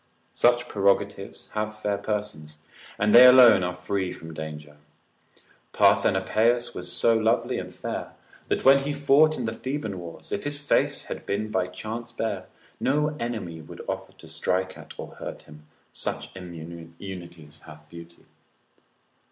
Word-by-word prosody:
Such 120 0 +3
prerogatives 100 -1 0
have 110 0 -3
fair 105 -1 -1
persons, 100 -8 -4 0.4
and 105 0 +2
they 120 - +11
alone 125 -7 +8
are 90 0 -2
free 90 +1 -2
from 80 -2 -9
danger. 75 -1 -8 1.0
Parthenopaeus 120 +2 +3
was 90 0 -6
so 115 +5 +3
lovely 110 0 +1
and - - -7
fair, - - -5 0.3
that - - -1
when 135 +1 +8
he 140 +2 -3
fought 145 +2 +4
in 125 - -3
the 110 - -2
Theban 115 -7 -4
wars, 85 -1 -10
if 100 - -2
his 145 0 -2
face 145 0 +1
had - - -7
been 105 +2 -2
by 90 -2 0
chance 115 +5 -6
bare, 115 -1 -3 0.3
no 150 +2 +1
enemy 110 -9 -4
would 80 - -11
offer - - -4
to - - -15
strike 95 0 -1
at - - -12
or - - -9
hurt - - -7
him, 75 0 -16 0.2
such - - -4
immunities 85 -1 -10
hath 75 -1 -13
beauty. 85 +1 -13
100 Hz, 150 wpm, -26 LUFS, 85-120 Hz, 1.0 s, they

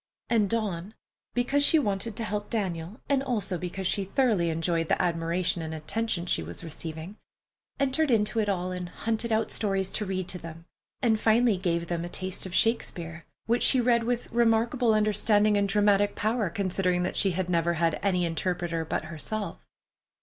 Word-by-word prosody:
And 215 -4 +3
Dawn, 210 -3 -2 0.4
because 260 +4 +2
she 320 - +6
wanted 210 -4 -1
to 230 - -3
help 210 -1 -3
Daniel, 190 -1 -3
and 275 -1 +2
also 210 -9 -1
because 180 +2 -5
she 200 +2 +1
thoroughly 195 -4 +1
enjoyed 165 0 0
the - - +2
admiration 170 0 0
and 160 0 -5
attention 195 +3 -2
she 175 - +1
was 85 +2 -6
receiving, 160 +4 -7 0.6
entered 275 +3 +1
into 220 -1 +2
it 210 -2 +1
all, 185 -2 -1
and 180 -1 -5
hunted 225 +4 -2
out 220 0 +1
stories 195 -3 0
to 210 - -1
read 185 -2 -3
to 180 - -4
them, 165 0 -10 0.4
and 220 -3 +3
finally 225 0 +4
gave 170 -2 -1
them 170 -1 -3
a 175 - -5
taste 185 +1 -4
of 185 - -6
Shakespeare, 170 -7 0 0.2
which 235 +2 +1
she 260 - +5
read 235 -1 +3
with 245 0 -2
remarkable 230 0 +2
understanding 210 0 +3
and 200 -1 +1
dramatic 205 0 +3
power, 215 -2 0
considering 185 -1 0
that 180 - -2
she 195 -3 +3
had 185 -2 -1
never 170 -1 +1
had 165 -1 0
any 180 -3 +1
interpreter 170 0 -2
but 160 - -2
herself. 170 +7 -5
195 Hz, 180 wpm, -27 LUFS, 175-225 Hz, 0.6 s, she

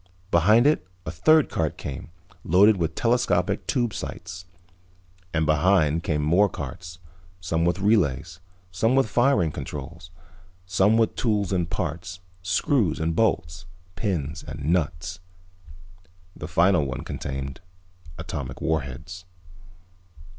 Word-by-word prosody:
Behind 105 +9 +5
it 150 +1 +2 0.2
a 80 - -3
third 155 - +4
cart 80 -2 -2
came, 70 -3 -7 0.3
loaded 100 +5 +5
with 80 -2 -2
telescopic 115 -7 +1
tube 120 -4 0
sights. 90 -2 -7 0.9
And 80 -1 0
behind 80 0 +3
came 75 -2 -1
more 90 +7 +4
carts, 85 -2 -7 0.4
some 85 -1 -1
with 85 +2 +1
relays, 85 - +1 0.3
some 110 +7 +1
with 135 -3 +3
firing 120 - +2
controls, 75 +3 -7 0.6
some 95 +4 +3
with 115 -2 +1
tools 105 -5 0
and 85 -3 0
parts, 85 0 -4 0.2
screws 90 - +1
and 80 +1 -1
bolts, 85 -5 0 0.3
pins 80 -5 -2
and - - -7
nuts. 85 +2 -2 1.2
The - - -7
final 85 -2 +3
one 65 -2 -4
contained 70 0 -5 0.6
atomic 70 -6 -6
warheads. 80 +4 -3
85 Hz, 120 wpm, -25 LUFS, 80-100 Hz, 1.2 s, Behind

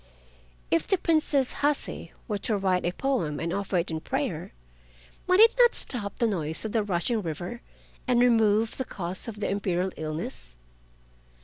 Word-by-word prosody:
If 165 - +2
the 385 - +3
Princess 310 -6 +2
Hase 290 0 0 0.2
were 210 -3 -2
to 215 +1 0
write 190 -2 +1
a 175 - +1
poem 190 - -1
and 170 +1 -2
offer 200 -2 -1
it 170 0 -1
in 160 - -2
prayer, - - -3 0.8
might 365 +1 +4
it 455 +1 +8
not 480 -1 +6
stop 205 -6 -3
the 235 - +2
noise 160 -5 -1
of 220 - -3
the 225 - +2
rushing 205 +3 0
river 175 +7 -5 0.5
and 245 -1 +3
remove 225 -2 +3
the 260 - -2
cause 185 -1 -4
of 215 -2 -6
the 210 - -1
Imperial 190 -2 0
illness? 155 - -5
205 Hz, 170 wpm, -27 LUFS, 175-245 Hz, 0.8 s, it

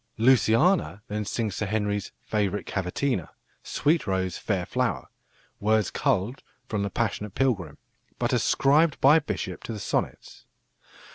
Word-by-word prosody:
Luciana 115 - +3
then 105 +1 -2
sings 110 -2 -2
Sir 110 - -2
Henry's 105 -1 -1
"favourite 105 -2 -1
cavatina," 95 - -2 0.3
"Sweet 155 -2 0
rose, 95 -2 -1
fair 95 -4 -2
flower," - - -1 0.5
words 110 -1 +2
culled 125 -2 0 0.3
from 105 -4 -2
The 100 - -1
Passionate 105 -1 -2
Pilgrim, 95 - 0 0.4
but - - -1
ascribed 150 +3 +3
by 145 +4 +6
Bishop 150 - -4
to 115 - -4
the 105 - -6
Sonnets. - - -3
110 Hz, 130 wpm, -26 LUFS, 100-130 Hz, 0.5 s, by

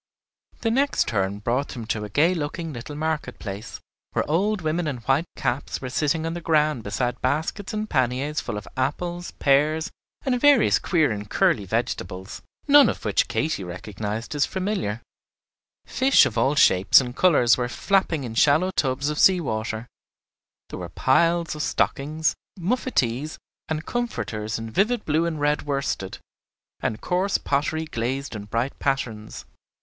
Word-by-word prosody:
The 225 - +1
next 275 +4 +2
turn 100 -2 -1
brought 120 +7 -1
them 120 -3 -7
to 110 -1 -2
a 105 - -6
gay 155 - +3
looking 160 0 -4
little 130 +4 -7
market 155 0 -2
place, 100 +2 -7 0.3
where - - 0
old 195 +6 +1
women 160 +1 -1
in 140 -4 -2
white 135 +8 0
caps 125 +3 -2
were 130 -1 -6
sitting 155 +4 0
on 165 - -2
the 175 - -5
ground 155 -5 +2
beside 120 +4 -2
baskets 160 +9 -1
and 215 0 -3
panniers 130 - 0
full 110 -4 -4
of 105 - -8
apples, 175 +7 -2
pears, 150 +3 +2 0.3
and 250 -2 0
various 290 -5 +5
queer 160 -7 +2
and 105 -1 -5
curly 175 - +2
vegetables, 95 -3 -3 0.3
none 290 0 +7
of - - -5
which - - +2
Katy 155 -11 -1
recognized 105 - -5
as 145 -1 +2
familiar; 185 - -2 0.8
fish 265 +1 +4
of 110 - -3
all 130 +5 +2
shapes 95 -9 +6
and 125 -2 -4
colors 135 -10 +5
were 120 -1 -2
flapping 175 -1 +1
in 120 -3 -5
shallow 150 +10 +3
tubs 135 -3 0
of 150 - -4
sea 190 -1 +6
water; 110 -5 -3 0.8
there - - -7
were - - -6
piles 170 +5 +2
of 150 - -5
stockings, 155 +2 0 0.3
muffetees, 155 - -1 0.3
and 155 0 -2
comforters 110 - -3
in 115 0 -6
vivid 215 - +1
blue 160 +2 +1
and 160 -2 -3
red 145 0 +1
worsted, 140 -9 -3 0.6
and 110 - -3
coarse 185 +2 +1
pottery 155 +3 -1
glazed 130 -1 -3
in 100 -1 -6
bright 115 +6 -2
patterns. 115 -6 -3
145 Hz, 160 wpm, -24 LUFS, 115-170 Hz, 0.8 s, none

